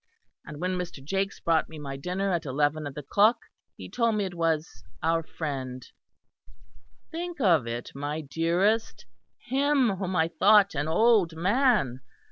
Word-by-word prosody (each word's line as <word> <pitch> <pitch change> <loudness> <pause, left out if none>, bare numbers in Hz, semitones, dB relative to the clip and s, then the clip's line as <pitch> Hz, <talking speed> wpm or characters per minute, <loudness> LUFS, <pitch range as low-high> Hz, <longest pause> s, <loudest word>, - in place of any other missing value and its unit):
And 150 -1 -8
when 180 +1 -1
Mr. 175 -5 -6
Jakes 195 +6 -2
brought 165 -2 +1
me 160 - -10
my 140 -2 -6
dinner 180 +7 -2
at 170 -2 -1
eleven 145 +3 0
of 140 - -9
the 150 - -6
clock, 210 - +4 0.4
he - - -8
told 230 -2 0
me 205 -2 0
it 185 - -5
was 165 -2 -2 0.2
our 165 +1 +2
friend 135 -6 -5 1.3
(think 340 0 -5
of 170 - +3
it, 120 +1 -5
my 145 +3 -4
dearest 175 +9 0 0.3
him 265 -4 +1
whom 185 -1 -3
I 160 -2 +3
thought 200 +4 +4
an 145 0 -2
old 195 -1 +3
man!) 195 - +2
170 Hz, 155 wpm, -27 LUFS, 150-205 Hz, 1.3 s, clock